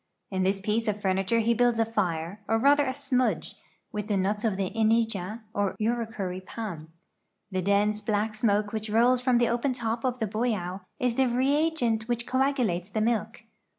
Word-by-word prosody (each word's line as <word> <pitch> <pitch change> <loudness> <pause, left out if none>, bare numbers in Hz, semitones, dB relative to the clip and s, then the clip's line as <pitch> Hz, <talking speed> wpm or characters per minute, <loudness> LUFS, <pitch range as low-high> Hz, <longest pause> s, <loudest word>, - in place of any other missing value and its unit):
In 190 -1 -1
this 195 +1 +1
piece 215 +3 -1
of 210 -1 0
fur 190 -2 +1
niture 195 +5 +1
he 235 +1 +3
builds 240 0 +2
a 225 - +3
fire, 190 -3 -2
or 225 - +2
rather 285 +4 +4
a - - +1
smudge, 260 -2 -1 0.4
with 210 0 -4
the 205 -3 +1
nuts 205 +3 0
of 215 -4 0
the 195 -2 -1
inija 220 -2 0
or 200 -1 0
urucur}' 215 -5 -2
palm. 180 -7 -7 0.6
The 185 0 -1
dense, 205 +2 +2
black 215 0 0
smoke 210 -1 +1
which 220 0 -3
rolls 240 +3 +4
from 250 -1 +3
the 240 -1 +3
open 240 +3 0
top 230 -2 -3
of 255 -1 0
the 225 - -1
boido 205 -4 -2 0.2
is 250 -1 +1
the 265 +2 +2
reagent 260 -3 +1
which 240 -1 -1
coagulates 250 -10 0
the 215 +2 -1
milk. 225 0 -1
220 Hz, 185 wpm, -27 LUFS, 200-240 Hz, 0.6 s, rather